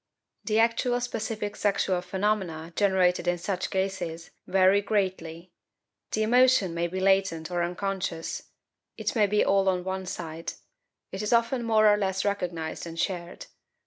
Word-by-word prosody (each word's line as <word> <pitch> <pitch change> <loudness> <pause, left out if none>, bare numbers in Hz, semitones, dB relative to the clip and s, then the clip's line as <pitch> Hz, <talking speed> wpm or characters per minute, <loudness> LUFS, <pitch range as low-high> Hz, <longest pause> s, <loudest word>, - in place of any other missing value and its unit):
The 215 -1 +1
actual 235 +2 +2
specific 220 -3 -3
sexual 195 -3 +1
phenomena 180 -3 -2
generated 185 -3 +2
in 175 0 +2
such 185 +1 -3
cases 180 -4 -3 0.2
vary 190 0 +2
very 195 +2 +5
greatly. 185 -4 -2 0.6
The 215 - +1
emotion 245 -5 +4
may 170 0 -1
be 185 +2 -4
latent 190 -4 +1
or 175 -1 0
unconscious; 180 -2 -3 0.5
it - - -2
may 210 -3 +4
be 210 +1 +2
all 195 -1 +3
on 180 -1 0
one 190 0 -4
side; 165 -2 -5 0.6
it 190 - -4
is 210 - -2
often 235 +2 +2
more 220 -2 +4
or 205 0 +5
less 190 -1 -1
recognized 175 -5 -3
and 165 0 -7
shared. 175 -2 -3
190 Hz, 150 wpm, -27 LUFS, 175-210 Hz, 0.6 s, very